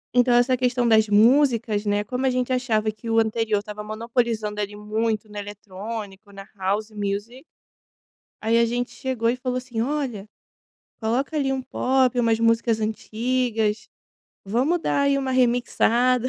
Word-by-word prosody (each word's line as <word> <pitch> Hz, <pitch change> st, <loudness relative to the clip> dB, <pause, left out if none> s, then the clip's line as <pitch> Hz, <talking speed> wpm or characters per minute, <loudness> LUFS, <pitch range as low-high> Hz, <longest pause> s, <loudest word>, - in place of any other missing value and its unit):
Então, 245 Hz, 0 st, +4 dB
essa 245 Hz, +1 st, +4 dB
questão 250 Hz, -1 st, +1 dB
das 220 Hz, -1 st, +5 dB
músicas, 230 Hz, -1 st, +3 dB
né, 205 Hz, 0 st, +1 dB
como 250 Hz, +5 st, -2 dB
a -, -, +4 dB
gente 255 Hz, 0 st, 0 dB
achava 225 Hz, -4 st, 0 dB
que 215 Hz, +2 st, -9 dB
o 225 Hz, -, +1 dB
anterior 220 Hz, -1 st, +1 dB
estava 210 Hz, +1 st, -6 dB
monopolizando 220 Hz, -1 st, -2 dB
ele 205 Hz, 0 st, -4 dB
muito 215 Hz, +1 st, -2 dB
no 210 Hz, -, -14 dB
eletrônico, 205 Hz, 0 st, -8 dB
na 195 Hz, 0 st, -11 dB
house 205 Hz, +3 st, -2 dB
music. 205 Hz, +5 st, -4 dB, 1.0 s
Aí 225 Hz, +1 st, +1 dB
a 235 Hz, -, +5 dB
gente 240 Hz, +2 st, -2 dB
chegou 255 Hz, -3 st, -2 dB
e 235 Hz, -, +2 dB
falou 255 Hz, 0 st, -2 dB
assim: 250 Hz, -3 st, -5 dB
"Olha 245 Hz, -6 st, -2 dB, 0.7 s
coloca 245 Hz, +7 st, -1 dB
ali 275 Hz, -2 st, +1 dB
um 265 Hz, -, -1 dB
pop, 260 Hz, 0 st, +1 dB
umas 230 Hz, -1 st, +2 dB
músicas 230 Hz, 0 st, +2 dB
antigas, 220 Hz, 0 st, -1 dB, 0.6 s
vamos 255 Hz, -, +1 dB
dar 285 Hz, -, 0 dB
aí 280 Hz, 0 st, +2 dB
uma 265 Hz, -1 st, -2 dB
remixada. 245 Hz, 0 st, +2 dB
230 Hz, 155 wpm, -23 LUFS, 215-250 Hz, 1.0 s, das